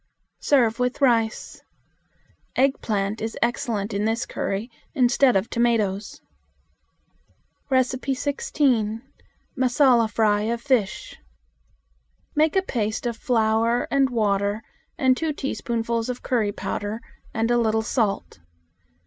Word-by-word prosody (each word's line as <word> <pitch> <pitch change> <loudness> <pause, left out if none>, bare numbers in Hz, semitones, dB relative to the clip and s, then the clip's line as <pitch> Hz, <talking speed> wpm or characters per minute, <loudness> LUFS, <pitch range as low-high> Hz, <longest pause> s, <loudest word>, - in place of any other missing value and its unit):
Serve 240 -5 +2
with 250 0 0
rice. 230 -5 +1 0.9
Eggplant 220 -6 0
is 225 +1 -4
excellent 235 -4 -1
in 200 +1 -1
this 225 +1 0
curry 200 +4 -3 0.3
instead 255 -1 +4
of 195 +3 +1
tomatoes. 220 -4 0 1.5
16. 260 -3 0 0.5
Massala 250 -3 +3
Fry 210 -1 +2
of 235 - -2
Fish. 250 - -1 1.2
Make 310 +3 +3
a 380 - +3
paste 225 - -2
of 235 -1 -1
flour 230 -1 +1
and 275 -1 +3
water 205 -2 0 0.3
and 260 -1 +3
two 315 +2 -2
teaspoons 235 -4 -2
of 250 - -5
curry 225 -5 +1
powder 205 +2 -4 0.3
and 225 +1 0
a 240 - +4
little 220 -1 +1
salt. 220 - -1
235 Hz, 105 wpm, -24 LUFS, 215-255 Hz, 1.5 s, instead